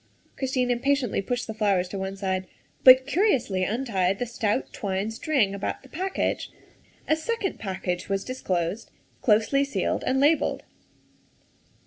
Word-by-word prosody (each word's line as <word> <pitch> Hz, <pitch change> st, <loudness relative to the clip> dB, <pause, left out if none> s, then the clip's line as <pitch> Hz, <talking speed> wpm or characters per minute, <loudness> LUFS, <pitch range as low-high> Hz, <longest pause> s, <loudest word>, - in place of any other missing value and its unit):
Christine 255 Hz, -2 st, 0 dB
impatiently 250 Hz, -2 st, +1 dB
pushed 245 Hz, +5 st, -2 dB
the 220 Hz, -, -5 dB
flowers 200 Hz, -4 st, 0 dB
on 195 Hz, -, -3 dB
one 190 Hz, 0 st, -4 dB
side, 190 Hz, -1 st, -2 dB, 0.4 s
but 260 Hz, 0 st, +9 dB
curiously 275 Hz, -, +1 dB
untied 195 Hz, -4 st, 0 dB
the 245 Hz, -, -2 dB
stout 230 Hz, 0 st, -2 dB
twine 200 Hz, +1 st, -2 dB
string 225 Hz, -4 st, +1 dB
about 200 Hz, +5 st, -4 dB
the 265 Hz, -, -16 dB
package. 375 Hz, +6 st, -2 dB, 0.6 s
A 310 Hz, -, +4 dB
second 405 Hz, +4 st, -3 dB
package 185 Hz, -3 st, -3 dB
was 195 Hz, 0 st, 0 dB
disclosed 190 Hz, -5 st, -2 dB, 0.3 s
closely 225 Hz, +5 st, +3 dB
sealed 280 Hz, -, -1 dB
and 265 Hz, +1 st, +2 dB
labelled. 290 Hz, +1 st, +2 dB
230 Hz, 135 wpm, -26 LUFS, 195-270 Hz, 0.6 s, but